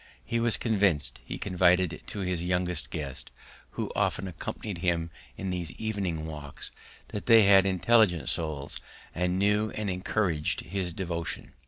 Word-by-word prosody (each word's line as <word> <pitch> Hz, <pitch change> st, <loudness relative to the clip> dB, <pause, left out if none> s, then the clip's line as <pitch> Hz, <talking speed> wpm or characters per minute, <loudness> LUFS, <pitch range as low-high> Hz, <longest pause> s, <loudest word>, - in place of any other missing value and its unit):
He 115 Hz, -, 0 dB
was 115 Hz, -1 st, +2 dB
convinced, 100 Hz, -, +1 dB
he -, -, -5 dB
confided 90 Hz, -2 st, +2 dB
to 105 Hz, -, -5 dB
his 90 Hz, -2 st, -1 dB
young 90 Hz, 0 st, +1 dB
guest, 75 Hz, -5 st, -4 dB, 0.4 s
who -, -, -3 dB
often 95 Hz, -, 0 dB
accompanied 90 Hz, +2 st, -5 dB
him 85 Hz, -2 st, 0 dB, 0.3 s
in 95 Hz, -1 st, -3 dB
these 90 Hz, -3 st, -3 dB
evening 95 Hz, -7 st, -2 dB
walks, 75 Hz, -3 st, -8 dB, 0.4 s
that 105 Hz, -, -6 dB
they 115 Hz, -2 st, +8 dB
had 100 Hz, -1 st, +7 dB
intelligent 95 Hz, -, +3 dB
souls 75 Hz, -4 st, -2 dB, 0.3 s
and 90 Hz, +1 st, 0 dB
knew 105 Hz, +2 st, +2 dB
and 105 Hz, -2 st, -1 dB
encouraged 90 Hz, -4 st, 0 dB
his 90 Hz, +1 st, -3 dB
devotion. 85 Hz, -2 st, -4 dB
90 Hz, 145 wpm, -28 LUFS, 85-100 Hz, 0.4 s, they